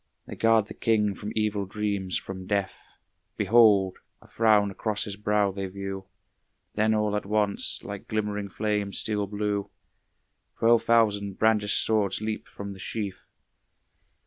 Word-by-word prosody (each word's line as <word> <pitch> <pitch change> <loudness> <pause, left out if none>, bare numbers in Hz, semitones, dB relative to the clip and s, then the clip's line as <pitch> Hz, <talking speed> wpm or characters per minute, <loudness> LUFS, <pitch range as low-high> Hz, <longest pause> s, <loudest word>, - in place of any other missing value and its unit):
They - - -8
guard 115 -2 +3
the - - -9
king 105 -3 +1
from 105 +2 -7
evil 105 -2 0
dreams, 100 -2 -2
from 95 -1 -7
death. 100 -2 -1 0.6
Behold! 105 -3 +4 0.2
a - - -19
frown 105 -3 +3
across 105 +1 -2
his 100 - -5
brow 105 -1 +1
they 95 0 -4
view. 95 0 -6 0.7
Then 110 +1 +2
all 105 -1 0
at 105 - -3
once, 105 -1 0
like - - -7
glimmering 105 -2 -2
flames 105 -1 -1
steel 105 -2 -1
blue, 105 0 -2 0.9
Twelve 115 0 +4
thousand 105 -4 +2
brandished 110 -2 +3
swords 105 -3 +1
leap 110 0 -4
from 100 0 -7
the 95 - -12
sheath. 100 0 -5
105 Hz, 145 wpm, -27 LUFS, 100-110 Hz, 0.9 s, Behold